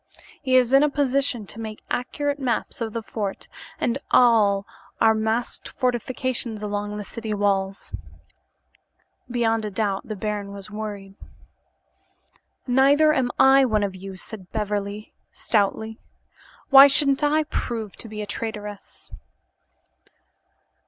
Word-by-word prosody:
He 260 -2 +3
is 250 0 +2
in 275 - +7
a 300 - +4
position 275 -5 0
to 220 - -7
make 220 -1 -7
accurate 285 +3 -2
maps 250 -2 -2
of 225 -1 -2
the 230 - -4
fort 205 -3 -5 0.3
and 255 -5 0
of - - -16
all 210 -5 +4 0.3
our 225 0 +5
masked 220 +2 -2
fortifications 245 -3 -2
along 205 0 -3
the 210 - -5
city 220 +1 -5
walls." 195 -1 -1 1.4
Beyond 225 -2 +1
a 210 - -3
doubt, 200 -1 -2
the 215 - -4
baron 205 -1 -4
was 200 +1 -7
worried. 205 -2 -6 1.5
"Neither 280 +4 +4
am 260 -4 +1
I 270 +1 +6
one 215 -5 +1
of 200 -2 -2
you," 190 +1 -8
said 185 0 -9
Beverly 210 -1 -3 0.2
stoutly. 220 +1 -1 0.7
"Why 275 +1 +11
shouldn't 275 0 +2
I 305 +1 +3
prove 225 -8 -4
to - - -7
be 210 0 -5
a - - -5
traitress?" 210 -1 -7
220 Hz, 130 wpm, -23 LUFS, 205-255 Hz, 1.5 s, Why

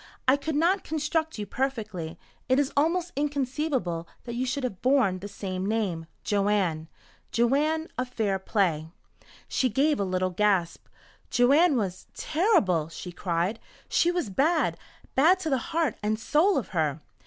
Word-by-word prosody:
I 260 - +6
could 290 +2 -3
not 360 +5 +2
construct 315 0 -1
you 210 - -3
perfectly. 215 -11 -3 0.3
It 260 - +4
is 285 -1 +1
almost 335 +4 +1
inconceivable 270 - -1 0.2
that 235 - -6
you 250 +2 -1
should 265 +2 -2
have 230 -8 -4
borne 250 -8 +3
the 200 - -6
same 190 -2 -5
name 195 -6 -1 0.2
Joanne. 195 -6 +1 0.4
Joanne, 295 +7 +2
of 255 0 -2
'Fair 210 -6 -1
Play.'" 175 -6 0 0.6
She 255 - +1
gave 285 +5 +2
a - - +1
little 185 -1 0
gasp. 190 -2 +1 0.4
"Joanne 280 +5 +4
was 190 -4 -3
terrible," 300 - +2
she 175 +2 -7
cried. 180 +4 -1 0.3
"She 340 - +3
was 350 - -1
bad 310 - +2 0.4
bad 325 +8 +5
to 320 -4 -2
the 265 - +2
heart 320 -7 0
and 215 +1 0
soul 315 - +3
of 260 - -2
her!" 155 -5 0
240 Hz, 155 wpm, -27 LUFS, 190-295 Hz, 0.6 s, I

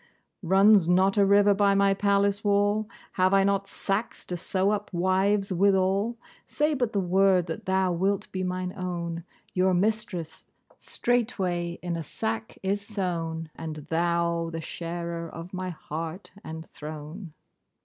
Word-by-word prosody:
Runs 195 0 +5
not 185 +2 +4
a 200 -1 +5
river 205 +1 +5
by 200 0 +3
my 200 0 +4
palace 200 0 +1
wall? 205 +1 +2 0.2
Have 185 +1 +3
I 195 - +5
not 195 0 +1
sacks 195 +3 -3
to 180 - -4
sew 190 +3 0
up 210 0 -3
wives 190 +2 +1
withal? 195 +4 +2 0.3
Say 300 +1 +1
but 245 -5 0
the 205 - 0
word, 185 -1 +3
that 165 -2 -6
thou 190 -1 +2
wilt 190 +3 0
be 185 - -3
mine 185 0 -3
own, 170 -3 -4 0.3
your 185 0 +3
mistress 185 -5 -2 0.3
straightway 190 -8 -1
in 175 -1 -2
a 165 - -3
sack 110 -7 -4
is 200 +2 0
sewn, 170 -6 -3
and 160 -1 -6 0.2
thou 170 0 +1
the 165 - -4
sharer 170 0 -5
of 165 +4 -9
my 185 0 -3
heart 165 +2 -6
and 160 0 -7
throne. 155 +3 -8
185 Hz, 150 wpm, -27 LUFS, 170-200 Hz, 0.3 s, Runs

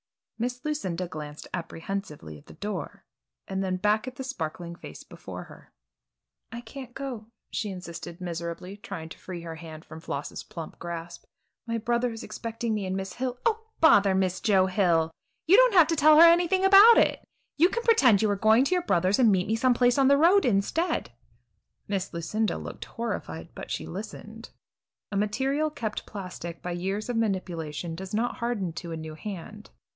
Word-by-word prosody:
Miss 245 +2 -3
Lucinda 185 - -2
glanced 150 -3 -8
apprehensively 165 - -5
at - - -24
the - - -12
door 210 +1 -5 0.4
and 190 0 -2
then 185 -1 -1
back 210 +5 +1
at 255 - -6
the 265 - -6
sparkling 170 - -5
face - - -11
before - - -9
her. - - -16 0.8
"I 235 0 -6
can't 245 +1 -10
go," 255 -6 -6 0.2
she 215 - -2
insisted 170 -2 -8
miserably, 170 +2 -5
trying 185 -6 -7
to - - -11
free 180 -2 -7
her 165 -1 -7
hand 160 -1 -10
from 160 - -10
Floss's 145 -2 -5
plump 165 -2 -9
grasp. 170 0 -7 0.4
"My 230 0 -1
brother 240 +2 0
is 225 +1 -7
expecting 230 0 -4
me 205 -3 -2
and 185 +1 -2
Miss 195 -1 -5
Hill 250 0 -3
" - - -37
"Oh, 445 -1 +1
bother 200 -11 +6
Miss 185 -1 0
Joe 195 -4 +4
Hill! 175 -4 +2 0.3
You 360 - +6
don't - - +6
have 345 -3 +8
to 330 - +2
tell 305 0 +6
her 335 - +11
anything 350 +3 +4
about 400 +4 +9
it! - - +3 0.3
You 340 +4 +5
can 470 +4 -2
pretend 255 - +5
you 210 - +3
are - - +1
going 220 +5 +4
to 320 - +1
your 360 - +2
brother's 185 - +2
and 235 -4 +6
meet 185 -2 +2
me 220 - 0
some 245 +2 +3
place 245 +2 +3
on 270 - +5
the 280 +1 +6
road 355 +7 +5
instead." 250 - 0 0.8
Miss 195 -2 -2
Lucinda 200 +6 -1
looked - - -7
horrified, 230 0 -5
but - - -8
she - - -3
listened. - - -8 0.6
A - - -4
material 265 +9 0
kept 220 -7 -5
plastic 180 -4 -7
by 180 - -3
years 195 +4 -3
of 240 - -1
manipulation 175 -6 -2
does 190 +4 -6
not 235 +3 -1
harden 220 -8 -2
to 170 +1 -7
a 165 - -4
new 160 0 -7
hand. 210 +5 -8
205 Hz, 190 wpm, -27 LUFS, 175-250 Hz, 0.8 s, her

